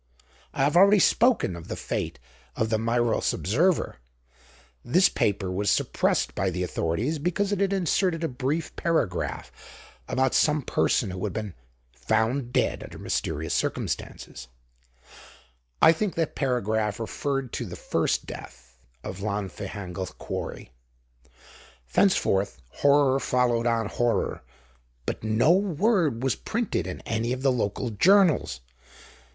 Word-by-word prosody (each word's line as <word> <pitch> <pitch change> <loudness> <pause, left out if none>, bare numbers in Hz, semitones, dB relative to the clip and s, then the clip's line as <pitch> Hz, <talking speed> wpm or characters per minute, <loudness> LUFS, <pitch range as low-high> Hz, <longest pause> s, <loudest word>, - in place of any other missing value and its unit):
I - - -1
have 145 +3 +2
already 200 +3 +7
spoken 225 - +3
of 85 - -10
the - - -4
fate - - -4 0.4
of 110 0 -1
the 110 - +2
Meiros 115 0 +1
Observer. 155 - +1 0.9
This 180 +10 +4
paper 100 -2 0
was 100 +2 0
suppressed - - +1
by 95 +9 0
the 90 0 -2
authorities 105 - -1
because 185 +6 -1
it 205 - 0
had 200 -1 +1
inserted 180 -2 +1
a - - +1
brief 145 +5 -3
paragraph 160 - -1 0.6
about 130 0 +1
some 150 -1 +3
person 110 -3 +1
who 90 0 -6
had 105 -4 -2
been 105 -4 -4 0.4
"found 110 - 0
dead - - +1
under - - -9
mysterious - - -2
circumstances"; - - -3 1.4
I - - +9
think 185 +2 -2
that 165 -2 -1
paragraph 110 -5 -1
referred 135 +3 -3
to - - -3
the - - -7
first - - -1
death - - -11 0.2
of 95 - -6
Llanfihangel 100 -2 -5
quarry. - - -6 1.2
Thenceforth, 100 - +2
horror 140 -1 +3
followed 120 -3 +1
on 115 -1 +1
horror, 120 +2 -1 0.6
but - - -4
no 110 +8 +3
word 180 - +2
was 135 - +2
printed 220 - -2
in 90 - -6
any 115 +1 -2
of 130 +1 -5
the 135 - +4
local 115 0 -2
journals. 165 - +3
120 Hz, 130 wpm, -26 LUFS, 100-160 Hz, 1.4 s, I